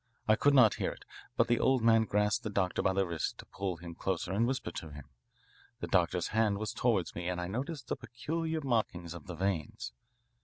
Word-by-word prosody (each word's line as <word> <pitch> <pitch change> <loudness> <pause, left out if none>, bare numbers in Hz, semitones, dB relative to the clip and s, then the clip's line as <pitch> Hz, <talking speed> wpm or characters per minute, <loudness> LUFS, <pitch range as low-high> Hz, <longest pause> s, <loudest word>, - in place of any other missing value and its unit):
I 110 - +6
could 140 +5 +4
not 115 -7 +7
hear - - +1
it. - - -16 0.3
But - - +4
the 120 -1 +2
old 130 -3 +3
man 115 -1 +5
grasped 105 0 +1
the 110 - -2
doctor 95 -3 0
by - - +2
the 95 0 +2
wrist 85 -3 -3
to - - -10
pull 95 -3 -4
him 85 +1 -8
closer 95 +1 -2
to 110 - +3
whisper 125 -7 -1
to 80 - -6
him. 70 -1 -11 0.7
The - - -3
doctor's - - +1
hand 110 -2 +2
was 110 0 -3
toward 110 -8 +1
me 85 +1 -3
and 90 -1 -2
I 90 - -2
noticed 135 - -4
the - - -1
peculiar 160 +6 -3
markings 105 - -1
of 85 - -10
the 90 - -5
veins. 85 -8 -2
100 Hz, 220 wpm, -32 LUFS, 90-120 Hz, 0.7 s, not